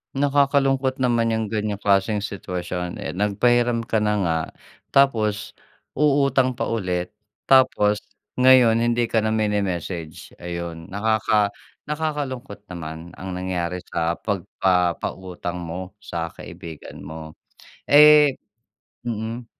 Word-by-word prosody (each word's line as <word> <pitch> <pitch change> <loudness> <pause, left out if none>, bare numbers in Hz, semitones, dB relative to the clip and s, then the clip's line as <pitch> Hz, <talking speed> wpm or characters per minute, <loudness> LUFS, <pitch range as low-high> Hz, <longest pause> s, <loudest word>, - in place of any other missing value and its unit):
Nakakalungkot 135 -1 +2
naman 120 -2 +2
yang 110 -1 -1
ganyang 105 -1 -2
klaseng 100 +1 +2
sitwasyon. 90 -3 -5
Eh, - - -4
nagpahiram 120 +4 +2
ka 110 -1 +1
na 105 - +2
nga 85 -4 +1 0.5
tapos, 105 -6 +2 0.4
uutang 140 -3 +3
pa 125 - -3
ulit 90 -3 -2 0.3
tapos, 105 -6 +4 0.3
ngayon 125 -3 +6
hindi 120 0 +1
ka 110 -1 +1
na 110 - +1
mini-message, 95 -6 -2
ayun. 85 -1 -6
Nakaka 105 0 +1 0.4
nakakalungkot 145 -7 -3
naman 80 -1 -7
ang 95 0 -7
nangyari 90 -1 -2
sa 85 0 -1
pagpapautang 90 -1 -1
mo 90 +2 -6
sa 85 -5 -4
kaibigan 85 -3 -10
mo. 80 0 -8 0.6
Eh 150 -1 +8 0.7
mm. 115 +1 -4
105 Hz, 105 wpm, -23 LUFS, 90-120 Hz, 0.7 s, Eh